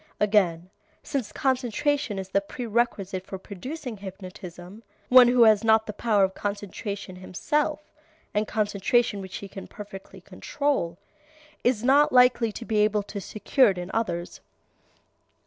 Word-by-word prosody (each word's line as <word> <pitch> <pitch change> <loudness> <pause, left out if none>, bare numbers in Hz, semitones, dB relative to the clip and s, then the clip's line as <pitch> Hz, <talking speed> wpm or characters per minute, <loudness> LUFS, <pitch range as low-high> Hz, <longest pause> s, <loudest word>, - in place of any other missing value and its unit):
Again, 190 -4 +2 0.3
since 270 -8 -3
concentration 260 -2 0
is 190 -1 -5
the 200 +1 +1
prerequisite 210 -4 -2
for 190 - -7
producing 235 - -7
hypnotism, 185 0 -10 0.3
one 250 -1 +9
who 245 0 +5
has 215 -2 +5
not 220 0 +4
the 215 - -5
power 210 -2 +2
of 190 0 +1
concentration 200 -1 -5
himself, 295 - -1 0.5
and 210 +1 0
concentration 210 +1 +1
which 190 -1 -8
he 200 - -6
can 195 0 -9
perfectly 200 -2 -10
control, 275 - -2 0.7
is 240 -3 +1
not 280 +4 +5
likely 250 -2 +4
to 230 - -8
be 220 -2 -1
able 210 0 +2
to 200 0 -7
secure 230 +6 +2
it 190 - -2
in 180 +1 -5
others. 175 -6 -3
210 Hz, 140 wpm, -26 LUFS, 195-240 Hz, 0.7 s, one